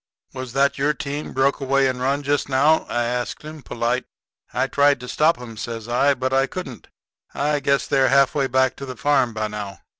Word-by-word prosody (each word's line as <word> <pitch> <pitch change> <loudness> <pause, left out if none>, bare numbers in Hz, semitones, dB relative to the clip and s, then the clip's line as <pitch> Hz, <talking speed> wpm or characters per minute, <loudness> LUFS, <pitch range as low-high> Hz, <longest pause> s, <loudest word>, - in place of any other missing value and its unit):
"Was 130 -2 -7
that 140 0 +2
your 150 +2 +1
team 145 +3 -5
broke 135 +2 +1
away 135 0 +2
and 125 -1 -3
run 140 +3 0
just 145 0 0
now?" 145 +4 +3
I 120 - 0
asks 120 +3 -3
him, 155 0 -9
polite. 120 0 -2 0.5
"I - - 0
tried 140 -1 +3
to 125 - -8
stop 155 +2 +2
'em," 115 -3 -9
says 115 0 -6
I, 140 +4 +2
"but 130 +1 -2
I 135 0 +3
couldn't. 135 - -8 0.5
I 145 +1 0
guess 140 0 +1
they're 135 -2 +2
half 135 0 +4
way 140 -2 +1
back 130 0 +2
to 140 - -7
the 130 -2 -7
farm 135 -1 +2
by 110 0 -1
now." 105 -3 -7
135 Hz, 210 wpm, -22 LUFS, 125-140 Hz, 0.5 s, half